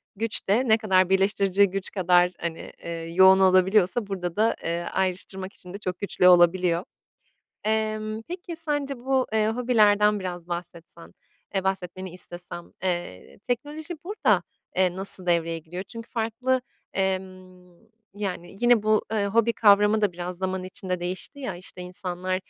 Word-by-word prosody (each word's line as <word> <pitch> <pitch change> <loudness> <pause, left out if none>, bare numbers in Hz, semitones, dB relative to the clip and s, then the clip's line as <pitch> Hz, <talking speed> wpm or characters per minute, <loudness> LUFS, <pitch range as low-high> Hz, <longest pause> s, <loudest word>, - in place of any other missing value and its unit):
güç 225 +2 -2
de 230 +7 +2
ne 220 -1 +5
kadar 185 -4 +2
birleştirici 195 0 +3
güç 195 0 -3
kadar, 180 -2 +3
hani, 165 -1 -5
eee, 170 - -5
yoğun 170 +3 +4
olabiliyorsa 190 +3 +3
burada 180 -3 -4
da, 220 +2 +2
eee, 170 +1 -2
ayrıştırmak 190 +1 -3
için 180 0 -11
de - - -5
çok 185 -3 -5
güçlü 195 -2 +2
olabiliyor. 175 0 +5 0.8
Emm, 215 0 -1
peki 350 -1 -6
sence 290 -4 -2
bu, 260 +1 0
eee, 215 -1 +2
hobilerden 210 -3 +3
biraz 175 -2 -6
bahsetsen, 170 -1 -8 0.4
eee, 190 - +1
bahsetmeni 185 -1 -3
istesem, 175 -1 -6
eee, 175 - -4
teknoloji 300 +7 -3
burada, 410 +5 +1 0.3
eee, 185 -1 +2
nasıl 190 -1 +3
devreye 165 -1 +1
giriyor? 175 +3 -7
Çünkü 230 +3 -10
farklı, 245 +3 -1 0.3
emm, 185 -1 -4 0.4
yani, 195 -3 -5
yine 240 -3 +4
bu, 215 0 +3
ııı, 205 -2 +1
hobi 230 +3 +2
kavramı 210 0 +4
da 205 -3 +2
biraz 175 +1 -6
zaman 190 0 -2
içinde 185 0 -4
değişti 185 +10 -6
ya, 235 -10 -4
işte, 180 +1 -10
insanlar, 180 0 -4
190 Hz, 145 wpm, -25 LUFS, 180-215 Hz, 0.8 s, ne